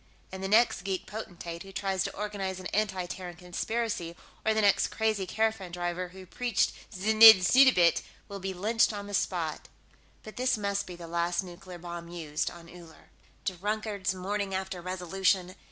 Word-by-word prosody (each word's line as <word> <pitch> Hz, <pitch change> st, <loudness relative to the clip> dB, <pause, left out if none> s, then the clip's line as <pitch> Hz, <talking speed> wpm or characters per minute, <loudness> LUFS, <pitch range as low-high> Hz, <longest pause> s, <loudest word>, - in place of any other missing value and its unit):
And 190 Hz, 0 st, -7 dB
the -, -, -1 dB
next 220 Hz, +1 st, +4 dB
geek 190 Hz, -1 st, -3 dB
potentate 175 Hz, -6 st, -7 dB
who 195 Hz, -, -10 dB
tries 190 Hz, 0 st, -1 dB
to -, -, -5 dB
organize 195 Hz, -2 st, -3 dB
an 185 Hz, -, -10 dB
anti 190 Hz, -3 st, 0 dB
Terran 175 Hz, 0 st, -7 dB
conspiracy, 180 Hz, +1 st, -3 dB, 0.3 s
or 220 Hz, -, +2 dB
the 220 Hz, -, +3 dB
next 200 Hz, -2 st, +4 dB
crazy 215 Hz, -4 st, -1 dB
caravan 220 Hz, -3 st, -1 dB
driver 175 Hz, +1 st, -3 dB
who 185 Hz, +1 st, -12 dB
preached 240 Hz, +4 st, 0 dB, 0.2 s
znidd 215 Hz, +1 st, +8 dB
suddabit, 215 Hz, -7 st, +5 dB, 0.3 s
will 200 Hz, 0 st, -7 dB
be 190 Hz, 0 st, -3 dB
lynched 215 Hz, +5 st, +2 dB
on 205 Hz, -1 st, -5 dB
the 205 Hz, -, -8 dB
spot. 170 Hz, -5 st, -1 dB, 0.6 s
But 215 Hz, -, -11 dB
this 255 Hz, -1 st, +1 dB
must 200 Hz, -1 st, -2 dB
be 180 Hz, -, -7 dB
the 170 Hz, -1 st, -9 dB
last 170 Hz, +2 st, -1 dB
nuclear 180 Hz, 0 st, -10 dB
bomb 170 Hz, 0 st, -7 dB
used 160 Hz, -3 st, -3 dB
on 170 Hz, -1 st, -12 dB
Uller.... 170 Hz, -2 st, -15 dB, 0.3 s
Drunkard's 200 Hz, +1 st, -2 dB
morning 195 Hz, +1 st, -2 dB
after 190 Hz, -1 st, -4 dB
resolution! 185 Hz, +1 st, 0 dB
190 Hz, 170 wpm, -29 LUFS, 175-210 Hz, 0.6 s, znidd